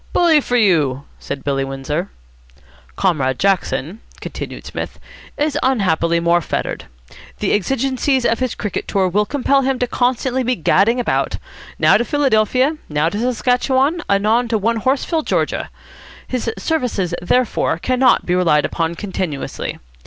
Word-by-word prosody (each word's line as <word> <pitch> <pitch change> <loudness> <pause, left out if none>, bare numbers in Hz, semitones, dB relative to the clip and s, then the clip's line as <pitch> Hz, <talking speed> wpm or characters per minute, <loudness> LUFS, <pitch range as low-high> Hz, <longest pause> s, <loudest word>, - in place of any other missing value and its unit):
"Bully 330 -4 +4
for 245 - -2
you," 155 - +2 0.2
said 140 -1 -6
Billy 135 -1 0
Windsor. 135 +7 -3 0.9
"Comrade 135 -9 +1
Jackson," 190 - 0 0.2
continued - - -7
Psmith, - - -6 0.4
"is 300 0 0
unhappily 170 -9 +1
more 170 +1 +2
fettered. - - -3 0.5
The - - 0
exigencies 265 +4 0
of 230 - +2
his 255 -3 -1
cricket 210 - -4
tour 190 -2 +1
will 205 +3 +1
compel 275 +1 +2
him 265 0 0
constantly 250 +1 0
to - - -3
be 250 +1 +1
gadding 205 +8 +2
about, 245 - 0 0.4
now - - +5
to - - 0
Philadelphia, 260 +1 +2
now 150 +2 +1
to 205 - -4
Saskatchewan, 260 +6 +1
anon 215 +5 +2
to 230 -1 +1
Onehorseville, 255 - 0 0.2
Ga. - - -4 0.6
His 245 -2 -2
services, 245 - -1
therefore, 225 -2 +1
cannot 255 +7 +2
be 175 - 0
relied 165 -5 +3
upon 165 0 -2
continuously. 180 -7 -4
220 Hz, 140 wpm, -18 LUFS, 170-255 Hz, 0.9 s, now